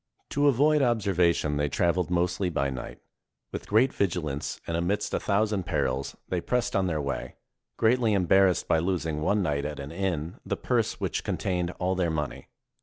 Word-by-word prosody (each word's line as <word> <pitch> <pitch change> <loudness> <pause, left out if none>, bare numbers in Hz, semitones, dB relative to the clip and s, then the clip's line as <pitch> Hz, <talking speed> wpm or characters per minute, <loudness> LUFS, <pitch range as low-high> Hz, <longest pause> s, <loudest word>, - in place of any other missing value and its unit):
To 145 +1 +3
avoid 145 +3 +4
observation, 90 - +2
they 75 0 0
traveled 85 +3 +1
mostly 90 +1 +1
by 70 -5 0
night. 65 -1 -6 0.5
With - - -6
great 115 +6 +3
vigilance, 80 -7 -2
and 85 - -2
amidst 100 +5 -1
a - - +1
thousand 100 -2 0
perils, 70 -5 -1
they 90 -2 -1
pressed 125 +3 -1
on 95 -1 +2
their 80 -3 -1
way, 70 -2 -4 0.4
greatly 115 -1 +3
em 95 -2 +1
barrassed 95 0 +4
by 80 - +3
losing 80 -3 -1
one 100 +6 +2
night 70 -4 0
at 75 0 -4
an 70 +1 -6
inn 85 -2 -3
the - - -2
purse - - 0
which - - -2
contained 90 -2 -1
all 90 +1 0
their 90 -2 0
money. 75 -3 -3
90 Hz, 180 wpm, -27 LUFS, 75-100 Hz, 0.5 s, avoid